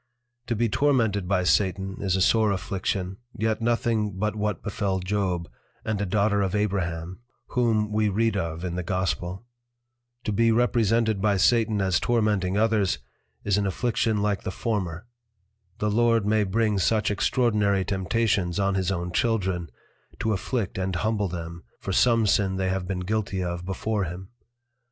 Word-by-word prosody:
To 120 - 0
be 115 +2 +1
tormented 110 -7 +1
by 90 -1 +1
Satan 95 +1 +1
is 95 -2 +1
a 95 - 0
sore 110 +2 +4
Affliction, 95 -1 -2 0.2
yet 110 +1 0
nothing 115 -3 +1
but 105 +2 -1
what 105 -1 -2
befel 100 -2 -1
Job, 90 -2 -1 0.4
and 105 -2 -1
a 100 - -1
Daughter 100 +1 +2
of 95 0 0
Abraham, 95 -4 -2 0.3
whom 110 -3 +1
we 105 0 +2
read 110 +2 +1
of 85 -3 -3
in 90 - -3
the 90 - -2
Gospel: 95 +2 -2 0.8
To - - -1
be 115 +3 +3
represented 115 -2 +2
by 105 -1 +2
Satan 110 0 +3
as 95 -2 +2
tormenting 105 -5 +1
others, 110 -3 +2 0.5
is 100 0 +2
an 100 - 0
Affliction 110 +1 0
like 105 -2 0
the - - -4
former; 95 -4 -3 0.7
the 105 -1 0
Lord 115 -1 +3
may 105 0 +2
bring 105 +1 +1
such 110 +2 +2
extraordinary 105 -3 +1
Temptations 95 -2 0
on 100 0 +1
his 95 -1 0
own 90 -1 -3
Children, 95 -5 0 0.5
to 110 - 0
afflict 100 -1 -2
and 95 -1 -2
humble 105 +2 0
them, 85 -1 -6 0.2
for 95 - -4
some 115 +1 +4
Sin 95 -1 +2
they 95 0 0
have 95 -1 -2
been 90 -1 -2
guilty 100 -1 -1
of 85 0 -4
before 100 +1 -1
him. 90 +3 -7
100 Hz, 160 wpm, -25 LUFS, 95-110 Hz, 0.8 s, sore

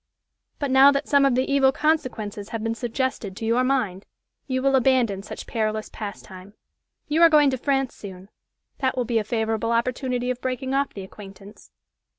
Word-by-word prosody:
but, 285 -3 -2
now 270 +2 +7
that 280 0 -2
some 280 -1 +4
of 270 -3 +3
the 255 - +2
evil 275 -1 +3
consequences 250 -10 -2
have 225 -1 -4
been 225 0 -1
suggested 235 -4 -3
to 225 - -5
your 235 +3 +2
mind, 235 -8 -1 0.4
you 260 -2 -1
will 270 +1 +2
abandon 245 -6 +2
such 205 - -9
perilous 215 -1 -2
pastime. 200 -2 -9 0.5
You 310 +3 +1
are 335 - +8
going 295 -3 +5
to 260 - -2
France 270 -1 0
soon 190 -1 -11 0.5
that 260 -2 -1
will 250 - 0
be 230 -1 +1
a - - -2
favorable 225 0 -1
opportunity 250 +1 -1
of 250 0 -6
breaking 260 +1 -3
off 275 +1 0
the 195 - -6
acquaintance." 195 +1 -13
245 Hz, 180 wpm, -24 LUFS, 215-270 Hz, 0.5 s, are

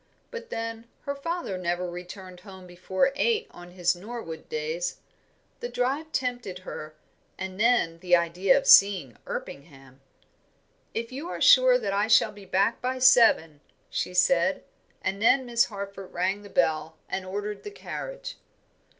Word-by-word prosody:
But 470 -1 -8
then, 230 0 -5
her 280 - -3
father 280 - -4
never 175 0 -2
returned 180 +1 -9
home 190 -1 -12
before 185 +8 0
eight 455 +4 +1
on 175 0 -12
his 175 -1 0
Norwood 180 -5 -8
days. 160 +3 -3 0.6
The 485 - -5
drive 275 - -2
tempted 245 -9 -3
her, 155 0 -8 0.4
and 190 0 -6
then, 215 -8 +2
the 180 0 +4
idea 175 +2 +2
of 275 - -1
seeing 190 - +6
Erpingham. 135 -2 -8 0.9
"If 230 +1 -3
you 285 +7 -6
are - - -5
sure - - +7
that 195 - -3
I 205 +2 +1
shall 230 - +5
be 205 -1 -13
back 195 +5 +1
by 255 +1 -2
seven," 230 - +5 0.3
she 180 - -3
said; 180 +9 +3 0.4
and 195 +1 -2
then 255 +3 +4
Miss 235 -1 +3
Harford 200 -2 -8
rang 190 +3 -1
the 205 - -12
bell 160 -3 0
and 190 - -3
ordered 205 +2 -5
the - - -7
carriage. - - -7
195 Hz, 150 wpm, -26 LUFS, 175-250 Hz, 0.9 s, sure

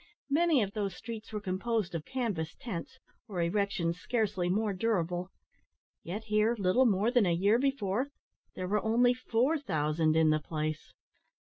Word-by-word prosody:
Many 315 -4 +4
of 200 0 -4
those 200 -4 -2
streets 225 0 -8
were 215 - -3
composed 200 0 -2
of 165 -2 -4
canvas 210 -12 -3
tents, 180 -9 -6 0.3
or 195 -5 -4
erections 170 -1 0
scarcely 200 -6 0
more 210 +2 +1
durable. 180 -3 -1 0.7
Yet 205 +6 -5
here, 215 +2 +2
little 205 +6 +3
more 210 +2 +2
than 245 -6 +4
a 175 - +3
year 200 +6 +3
before, 260 -2 0 0.5
there 185 - -3
were 210 +2 0
only 240 +3 +4
four 255 +5 +1
thousand 155 - +1
in 160 -1 +5
the 155 - +2
place! 155 0 -4
205 Hz, 155 wpm, -31 LUFS, 175-230 Hz, 0.7 s, in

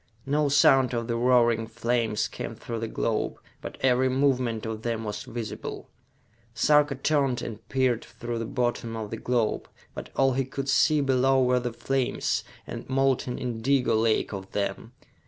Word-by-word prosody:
No 145 +1 +1
sound 135 -2 +5
of 115 0 -1
the 115 - -1
roaring 120 -2 +3
flames 115 -1 0
came - - -6
through 115 -1 -5
the 115 - -3
globe, - - -1 0.2
but - - -7
every 130 0 +3
movement 130 -4 +1
of 110 -1 -4
them 115 -1 -2
was 105 -1 -4
visible. 115 -3 -6 0.6
Sarka 150 +4 +4
turned 135 -3 +1
and 110 -1 -8
peered 130 -3 +1
through 120 -1 -6
the 115 - -3
bottom 120 -2 -2
of 110 -2 -5
the 115 - -3
globe; 120 -2 -1 0.2
but - - -7
all 135 -1 +3
he 135 +1 +1
could 135 +1 -5
see 150 +2 +4
below 135 -1 +3
were 125 0 +3
the 120 -1 -3
flames, 135 +2 -1 0.2
a - - -6
molten 130 -2 +1
indigo 125 +2 0
lake 110 -1 +1
of 95 -1 -7
them. 100 +3 -3
125 Hz, 165 wpm, -26 LUFS, 115-135 Hz, 0.6 s, sound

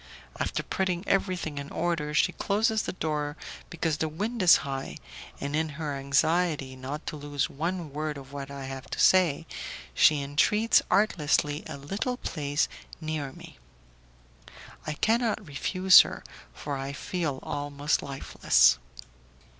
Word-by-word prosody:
After - - -1
putting 185 -1 -2
everything 180 -6 0
in 140 0 -7
order, 160 -4 -1
she - - +4
closes 220 +2 +1
the - - -4
door 150 -3 -2 0.3
because 165 -2 -1
the 160 - -1
wind 215 +9 -3
is 180 -2 +8
high, 135 -1 -4 0.4
and 140 +1 -3
in 160 0 0
her 150 -3 -3
anxiety 140 +1 +1
not 135 +4 -6
to - - -4
lose 145 -1 -2
one 165 0 -3
word 150 0 -3
of 135 0 -11
what 140 -1 -6
I 140 -1 -7
have 135 -1 -7
to - - -5
say, 170 -4 +4 0.5
she 150 -2 +5
entreats 210 +11 +3
artlessly 155 -7 +2
a - - -6
little 195 - -3
place 145 - -1 0.3
near 155 -4 -3
me. - - -13 1.3
I 155 - -1
cannot 225 +4 +1
refuse 185 +5 +6
her, - - -6 0.3
for 140 - -5
I 135 +1 -4
feel 150 -2 -3
almost 145 0 -1
lifeless. 100 - +3
150 Hz, 140 wpm, -28 LUFS, 140-180 Hz, 1.3 s, is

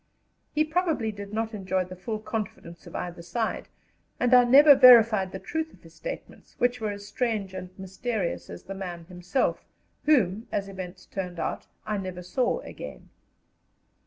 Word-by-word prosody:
He 305 - +4
probably 315 -8 0
did 200 -1 -8
not 225 +1 -2
enjoy 190 -2 -1
the 185 +1 -9
full 215 +4 -4
confidence 210 -6 -6
of - - -10
either 175 -1 -5
side, 220 +7 -3 0.5
and 250 0 +2
I 250 -1 +8
never 285 +4 +9
verified 230 -7 +7
the 190 - -5
truth 320 +9 -3
of - - -26
his - - -15
statements, - - -8
which 245 -1 +1
were 215 - -1
as 205 0 -7
strange 215 -7 -2
and 185 -1 -6
mysterious 190 +1 -3
as - - -9
the 195 - -7
man 175 -3 -6
himself, 180 +7 -1 0.4
whom, 225 -7 +3
as 200 -1 -1
events 185 -1 -8
turned 180 -3 -5
out, - - -3 0.2
I 210 -1 -1
never 185 -2 -6
saw 250 - 0
again. - - -9
205 Hz, 165 wpm, -27 LUFS, 185-245 Hz, 0.5 s, never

